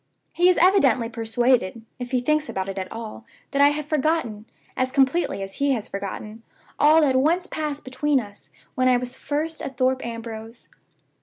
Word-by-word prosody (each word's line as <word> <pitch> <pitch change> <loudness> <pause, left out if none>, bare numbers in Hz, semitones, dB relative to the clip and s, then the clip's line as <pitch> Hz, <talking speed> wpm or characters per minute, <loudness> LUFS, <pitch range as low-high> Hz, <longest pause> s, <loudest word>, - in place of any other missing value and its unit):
He 355 +1 +4
is 365 - +3
evidently 285 -11 +4
persuaded 230 -1 0 0.2
(if 245 -1 -5
he 255 -1 0
thinks 305 +4 0
about 190 0 -3
it 195 0 -4
at 185 - -6
all) 225 0 -7 0.3
that 280 0 +1
I 285 - +8
have 295 0 -1
forgotten, 295 -8 -1 0.3
as 255 0 0
completely 270 - +1
as 195 0 -9
he 280 -1 +2
has 225 -5 -3
forgotten, 205 +3 -6 0.4
all 310 +2 +6
that 275 -4 +3
once 330 +7 +2
passed 300 -5 -4
between 270 +2 +1
us 205 -3 -11 0.2
when 255 0 +1
I 250 -1 +5
was 250 +1 -5
first 305 +4 -3
at 270 -2 -6
Thorpe 260 +1 +1
Ambrose. 230 0 -7
255 Hz, 180 wpm, -24 LUFS, 225-295 Hz, 0.4 s, I